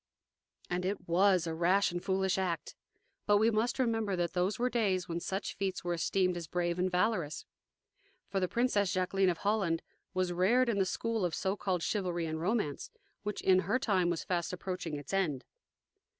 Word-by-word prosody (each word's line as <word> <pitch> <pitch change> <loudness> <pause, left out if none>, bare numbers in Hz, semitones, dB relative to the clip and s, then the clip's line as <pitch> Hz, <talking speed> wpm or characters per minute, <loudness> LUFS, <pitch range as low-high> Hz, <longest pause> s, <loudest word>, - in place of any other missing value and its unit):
And 180 +1 -2
it 190 0 -3
WAS 180 0 +4
a 165 - -2
rash 180 +5 +3
and 175 +1 -4
foolish 190 0 +1
act. 175 -3 -2 0.5
But 205 0 +5
we 220 +2 +4
must 220 +3 0
remember 225 -6 +1
that 175 -1 -1
those 185 +3 0
were 245 - +1
days 200 -8 0
when 170 0 -2
such 190 +3 -3
feats 190 -2 -3
were 175 0 -1
esteemed 180 +2 +1
as 170 -2 -5
brave 175 +1 -1
and 185 +1 +2
valorous. 180 -4 0 0.9
For 195 - +1
the 185 - +1
Princess 210 -4 +1
Jaqueline 190 0 +2
of 175 - 0
Holland 195 -5 0 0.3
was 185 -1 0
reared 235 +8 +3
in 205 -3 +1
the 190 - +3
school 225 +2 -1
of 175 -3 0
so 190 0 -1
called 185 -4 -1
chivalry 180 -5 -1
and 160 0 -3
romance, 180 -6 -1 0.3
which 210 0 -4
in 185 -1 +5
her 195 +7 +1
time 190 -8 +1
was 170 -2 -1
fast 175 -2 -1
approaching 180 -4 -4
its 145 +5 -8
end. 160 -9 0
185 Hz, 190 wpm, -32 LUFS, 175-205 Hz, 0.9 s, But